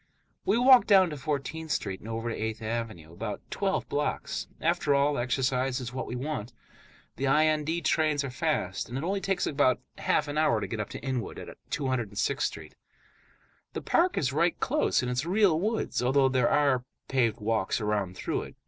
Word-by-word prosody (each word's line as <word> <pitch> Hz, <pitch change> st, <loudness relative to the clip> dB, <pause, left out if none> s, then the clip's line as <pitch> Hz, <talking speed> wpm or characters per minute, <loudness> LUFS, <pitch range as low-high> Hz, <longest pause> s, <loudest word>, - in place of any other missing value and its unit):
We 210 Hz, -, +3 dB
walk 255 Hz, +1 st, +7 dB
down 190 Hz, -4 st, +6 dB
to -, -, -4 dB
Fourteenth 155 Hz, +2 st, -3 dB
Street 95 Hz, -9 st, -2 dB
and 110 Hz, -, -10 dB
over 115 Hz, +1 st, -3 dB
to -, -, -3 dB
Eighth 110 Hz, 0 st, -4 dB
Avenue, 110 Hz, -8 st, -4 dB
about -, -, -4 dB
twelve -, -, -1 dB
blocks; -, -, -2 dB
after 145 Hz, -, +2 dB
all, 140 Hz, +1 st, +3 dB
exercise 130 Hz, +1 st, 0 dB
is 125 Hz, -1 st, -6 dB
what 130 Hz, -, -4 dB
we -, -, -4 dB
want. 130 Hz, -3 st, -4 dB, 0.6 s
The 135 Hz, +3 st, -1 dB
IND 155 Hz, +3 st, +2 dB
trains 155 Hz, -3 st, +2 dB
are 140 Hz, -, -4 dB
fast, 125 Hz, -, -1 dB
and 125 Hz, -, -4 dB
it 135 Hz, -, -3 dB
only 195 Hz, +3 st, -1 dB
takes 195 Hz, -1 st, 0 dB
about 140 Hz, -4 st, +2 dB, 0.2 s
half -, -, +1 dB
an 145 Hz, +1 st, -1 dB
hour 120 Hz, -8 st, +3 dB
to 105 Hz, -, -3 dB
get 110 Hz, -, -5 dB
up 105 Hz, -, -3 dB
to -, -, -7 dB
Inwood, 130 Hz, -3 st, -3 dB
at -, -, -8 dB
206th 130 Hz, -1 st, -1 dB
Street. -, -, -3 dB, 1.0 s
The -, -, -5 dB
park 355 Hz, +2 st, +2 dB
is 135 Hz, -2 st, 0 dB
right 170 Hz, +3 st, +1 dB
close, 300 Hz, -, +1 dB
and 125 Hz, -, -2 dB
it -, -, 0 dB
is 125 Hz, +5 st, -1 dB
real 185 Hz, -4 st, +3 dB
woods, 215 Hz, -, -1 dB
although 135 Hz, +2 st, +3 dB
there 130 Hz, -2 st, +2 dB
are 140 Hz, -4 st, +3 dB, 0.2 s
paved 120 Hz, -4 st, +1 dB
walks 110 Hz, -2 st, 0 dB
around 105 Hz, -4 st, -1 dB
through -, -, -2 dB
it. -, -, -10 dB
135 Hz, 195 wpm, -28 LUFS, 115-155 Hz, 1.0 s, walk